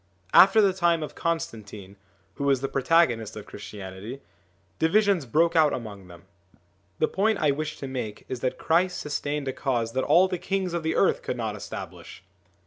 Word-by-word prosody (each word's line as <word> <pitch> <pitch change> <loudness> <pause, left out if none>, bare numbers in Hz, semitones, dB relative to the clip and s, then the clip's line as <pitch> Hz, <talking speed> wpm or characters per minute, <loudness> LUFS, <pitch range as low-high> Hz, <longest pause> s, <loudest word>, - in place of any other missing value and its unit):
After 200 +3 +7
the 195 -2 +3
time 170 -3 +1
of 150 - -7
Constantine, 105 - -4 0.4
who 140 - -6
was 135 -2 +2
the 135 - -1
protagonist 135 -5 +2
of 105 - -8
Christianity, 100 +4 -9 0.6
divisions 195 - +2
broke 165 +7 +2
out 155 -3 +4
among 100 -6 -7
them. 85 -1 -14 0.7
The 155 - +2
point 215 +2 +1
I 150 -5 +2
wish 155 +2 -4
to 135 - -6
make 120 -5 -5
is 130 - -5
that 130 +1 -2
Christ 180 +3 +1
sustained 145 -1 -3
a 130 - -1
cause 120 -5 -1
that 130 +2 -1
all 175 +5 +5
the 180 -2 -4
kings 185 0 -2
of 170 - -1
the 160 0 -1
earth - - +2
could 485 0 -4
not - - -3
establish - - -9
150 Hz, 180 wpm, -26 LUFS, 115-170 Hz, 0.7 s, After